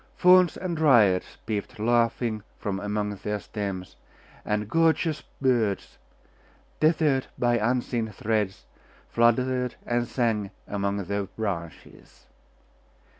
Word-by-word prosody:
Fauns 180 -2 +5
and 180 -2 -3
Dryads 120 - +4
peeped 105 -2 -4
laughing 115 0 +1 0.2
from 100 -3 -3
among 105 0 -2
their 105 +2 -3
stems, 100 -4 -5 0.5
and 105 0 -1
gorgeous 165 - +2 0.2
birds, 120 -7 0 0.8
tethered 155 -4 +2
by 120 -1 +2
unseen 120 0 0
threads, 105 - -2 0.4
fluttered 125 +2 +2
and 120 0 0
sang 115 -5 0 0.2
among 100 0 -1
their 100 +2 -2
branches. 95 -5 -7
110 Hz, 100 wpm, -26 LUFS, 100-125 Hz, 0.8 s, Fauns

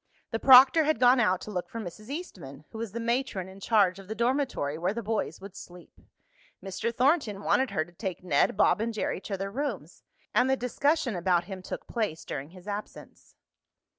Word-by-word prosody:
The 225 - -1
proctor 265 +5 +8
had 310 -6 +1
gone 250 +1 +6
out 185 -6 +2
to 215 - -7
look 180 -3 -4
for 230 - -6
Mrs. 215 +3 -8
Eastman, 170 - -8
who 220 - -8
was 230 -3 -4
the 235 - -5
matron 235 -5 -1
in 190 +1 -12
charge 195 -3 +2
of 195 - -12
the 220 - -5
dormitory 240 - 0
where 180 +6 -2
the 235 - -4
boys 220 +1 -2
would 195 0 -11
sleep. 180 -2 -13 0.6
Mr. 195 +4 -3
Thornton 245 - +1
wanted 205 +7 +2
her 155 - -1
to 175 - -18
take 180 -1 -6
Ned, 175 +2 +2
Bob 210 - +3
and 230 0 -2
Jerry 205 - -2
to 195 -1 -4
their 195 +1 -4
rooms, 215 - -4 0.3
and 250 +1 +3
the 265 - +2
discussion 265 0 0
about 175 0 +1
him 190 +1 -8
took - - -7
place 215 -9 -3
during 140 +1 -5
his 185 +2 -15
absence. 205 +1 -8
210 Hz, 200 wpm, -28 LUFS, 185-245 Hz, 0.6 s, proctor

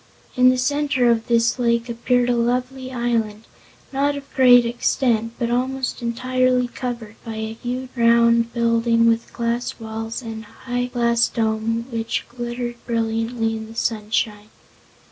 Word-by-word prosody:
In 255 0 +6
the 255 - +2
center 260 -2 +2
of 230 -1 0
this 235 +1 +2
lake 235 -1 +1
appeared 245 +1 +1
a 245 - +2
lovely 250 +2 -1
island, 230 -3 -1 0.5
not 285 +1 +1
of 280 -1 -9
great 245 -2 +6
extent 235 -1 0
but 235 0 -1
almost 260 +1 -1
entirely 250 +1 +1
covered 235 -3 -6
by 225 -2 -6
a 220 0 -4
huge 250 +3 -5
round 235 0 +4
building 230 0 +2
with 230 0 +1
glass 235 +1 -2
walls 225 +2 -5
and 225 -1 -6
a 220 - -14 0.2
high 245 0 -1
glass 235 -1 +2
dome 225 +1 -1
which 225 -1 -2
glittered 240 0 -5
brilliantly 225 0 -1
in 220 0 -6
the 225 - -12
sunshine. 215 -1 -1
235 Hz, 145 wpm, -21 LUFS, 230-250 Hz, 0.5 s, In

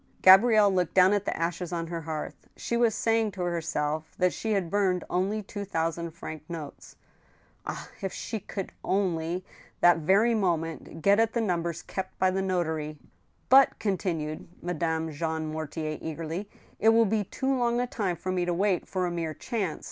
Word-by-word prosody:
Gabrielle 205 +1 +7
looked 180 -3 0
down 185 +1 +6
at 205 -1 0
the - - -2
ashes 170 +1 -2
on 170 -1 -2
her 165 0 -4
hearth. 155 -1 -6
She 235 - -2
was 235 -2 +3
saying 225 -2 +1
to 185 - -6
herself 160 -3 -2
that 180 -1 +2
she 220 -1 -2
had 190 -5 -1
burned 190 -3 +1
only 200 +4 0
two 205 +1 -6
thousand 165 -2 -2
franc 160 -2 -8
notes. 160 -4 -8 0.7
Ah! - - -5
if 195 - -2
she 220 - -4
could 195 -1 -6
only— 180 -2 0 0.4
that 175 -1 +6
very 200 +9 +4
moment— 165 -6 -2
get 200 +2 +5
at 225 0 +2
the 235 - 0
numbers 170 -5 -1
kept 190 -1 -5
by 185 0 +3
the 190 +1 0
notary! 160 -5 -1 0.5
"But," 270 +1 +6
continued 165 -6 -2 0.2
Madame 160 -2 -1
Jean 160 +1 -3
Mortier, 155 0 -4
eagerly, 165 +5 -5 0.3
"it 220 - +5
will 225 0 +5
be 215 0 +1
too 270 +7 -1
long 240 -1 +1
a 245 - +1
time 200 -7 -2
for 185 +3 -4
me 180 -1 0
to 175 -1 0
wait 190 0 +1
for 185 -1 -1
a 175 - -1
mere 165 -2 -3
chance. 200 -9 -3
180 Hz, 180 wpm, -28 LUFS, 165-205 Hz, 0.7 s, Gabrielle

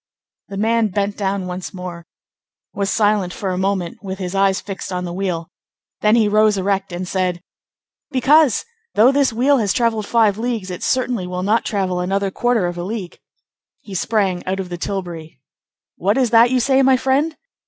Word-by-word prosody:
'" - - -71
The 195 - -6
man 225 +2 +2
bent 200 0 -1
down 195 -1 -2
once 180 +2 -6
more, 175 -2 -7 0.7
was 200 -1 -1
silent 205 -4 +1
for 195 -2 -3
a 180 - -2
moment, 190 -3 -1
with 190 -2 -5
his 185 -1 -4
eyes 195 0 +2
fixed 195 -1 -7
on 180 0 -3
the 175 - -5
wheel; 175 -3 -3 0.5
then 210 +1 +4
he 225 -3 +4
rose 215 0 +3
erect 195 0 -1
and 180 +1 -4
said:— 185 -2 -1 0.7
"Because, 280 0 +4 0.3
though 230 +5 +6
this 275 -2 +2
wheel 260 +5 +3
has 205 -3 +1
travelled 225 -4 0
five 220 -3 +3
leagues, 225 -5 -2
it 180 - -6
certainly 235 -4 0
will 180 0 -4
not 215 +4 +1
travel 190 -3 -1
another 195 +2 -1
quarter 240 -2 +1
of 175 0 -3
a - - -3
league." 195 -2 -6 0.6
He 200 - -11
sprang 190 -2 0
out 190 +1 -1
of 185 -2 -4
the 175 - -5
tilbury. 170 -7 -5 0.6
"What 200 +6 +1
is 250 -4 +2
that 230 +1 +6
you 255 0 +2
say, 265 +2 +3
my 265 -1 +5
friend?" 275 +5 0
200 Hz, 190 wpm, -19 LUFS, 185-230 Hz, 0.7 s, though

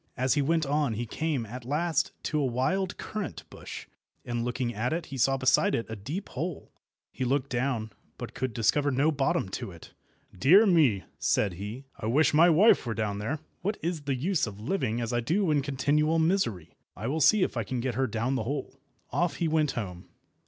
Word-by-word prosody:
As 130 +1 +2
he 145 - +2
went 160 +2 +1
on 145 -3 +1
he 120 +3 -3
came 145 0 -2
at 120 +3 -8
last 155 +4 0
to 150 - 0
a - - +1
wild 180 +10 -1
currant 215 -3 -5
bush, - - -8 0.4
and 120 -1 -2
looking 120 0 -2
at 115 +7 -1
it 170 0 -2
he 135 - -7
saw 135 +2 +3
beside 130 -1 +3
it 115 - -2
a 110 - -4
deep 145 - -5
hole. 165 +3 -5 0.4
He - - -4
looked 130 +1 0
down, 120 -3 -1 0.3
but - - -7
could 130 -1 -2
discover 125 +6 +2
no 140 +4 +2
bottom 135 -8 0
to 95 - -5
it. 85 -3 -13 0.4
"Dear 175 - +6
me!" 150 - +4 0.2
said 100 -4 +1
he, 105 +9 -7
"I 110 - -3
wish 145 +8 +3
my 165 +4 +6
wife 185 +8 +5
were 110 - -2
down 105 -1 -2
there! 140 +9 -3 0.2
What 205 +4 -1
is 170 -2 -2
the 140 -2 -1
use 155 +2 0
of 105 -1 -8
living 120 - -1
as 120 0 -2
I 120 - +2
do 165 - +1
in 145 -2 +3
continual 145 +3 +1
misery? 160 - 0 0.2
I 110 - -6
will 150 +6 -1
see 210 +6 +5
if - - -2
I 115 - 0
can 125 +4 -3
get 125 +1 -1
her 130 +3 0
down 115 +4 -1
the 130 - -1
hole." 135 0 -4 0.3
Off 175 -5 0
he 170 - 0
went 155 -2 +1
home. 90 -6 -6
135 Hz, 210 wpm, -28 LUFS, 115-160 Hz, 0.4 s, Dear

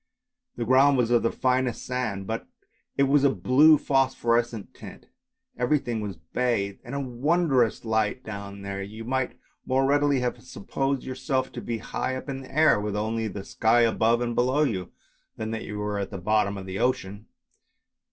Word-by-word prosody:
The 120 - -3
ground 135 +3 +5
was 120 -1 +1
of 120 - +4
the 115 - +1
finest 130 -2 0
sand, 115 -6 -3
but 115 +3 -4 0.5
it 140 - +4
was 140 +1 +3
of 140 - +5
a - - -9
blue 140 - +6
phosphorescent 120 -5 0
tint. - - -12 0.5
Everything 125 -3 0
was 100 -4 -5
bathed 100 +3 -1
in 125 - -7
a - - -1
wondrous 135 -1 +1
blue 115 - -6
light 110 +3 0
down 100 -2 -7
there; 100 0 -4
you 110 +3 -8
might 130 +1 -2 0.3
more 135 +1 +1
readily 145 0 +3
have 125 -1 -2
supposed 135 +6 -3
yourself 130 0 -2
to - - -7
be 115 -1 -3
high 130 +3 -3
up 130 - -7
in 135 -1 -4
the 130 - -12
air, 155 -8 +4
with 105 0 -3
only 110 +1 -1
the 100 -1 -7
sky 115 +2 +3
above 115 0 +3
and 120 -1 -1
below 130 +5 +2
you, 95 - -2 0.5
than 110 0 -4
that 115 - -4
you 105 - -6
were 105 0 -2
at 100 - -3
the 100 - -6
bottom 100 +1 +1
of 95 - -7
the 95 +1 -5
ocean. 110 -4 -1
120 Hz, 190 wpm, -26 LUFS, 105-130 Hz, 0.5 s, blue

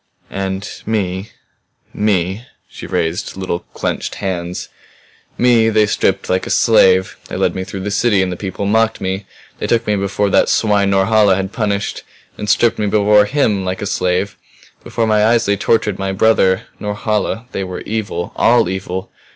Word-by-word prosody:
"And 95 +1 -3 0.2
me 100 -2 -2 0.6
me" 100 +2 0 0.2
she - - -10
raised 80 +3 -2
little 90 -2 -2
clenched - - -4
hands 90 -2 -4 0.7
"me 120 -2 +4
they 110 -1 +3
stripped 95 -2 0
like 95 0 0
a - - -5
slave. 95 -5 +4
They - - -6
led - - +1
me 95 - -3
through 95 0 -7
the 100 +2 -3
city 105 -2 +2
and 90 - -2
the - - -3
people 95 +1 -4
mocked 110 +2 +2
me. 95 +1 -3 0.3
They - - -2
took 115 0 +1
me 105 - +1
before 100 0 -1
that - - +3
swine 105 -2 +2
Norhala 100 +1 +4
has 95 0 -3
punished 100 -3 -2 0.3
and 105 - -5
stripped 115 +2 +3
me 105 - 0
before 105 0 +4
him 110 -6 +1
like 95 +1 -3
a - - -2
slave. 95 0 -1 0.5
Before 115 - -1
my 110 -1 +3
eyes 115 +1 +3
they 100 - +2
tortured 105 -1 0
my 95 0 -1
brother. 95 -2 +3 0.2
Norhala 105 +2 -2
they 100 - -3
were 90 -1 -6
evil, 100 -5 -4
all 120 -5 +4
evil! 95 0 -4
100 Hz, 170 wpm, -17 LUFS, 95-110 Hz, 0.7 s, me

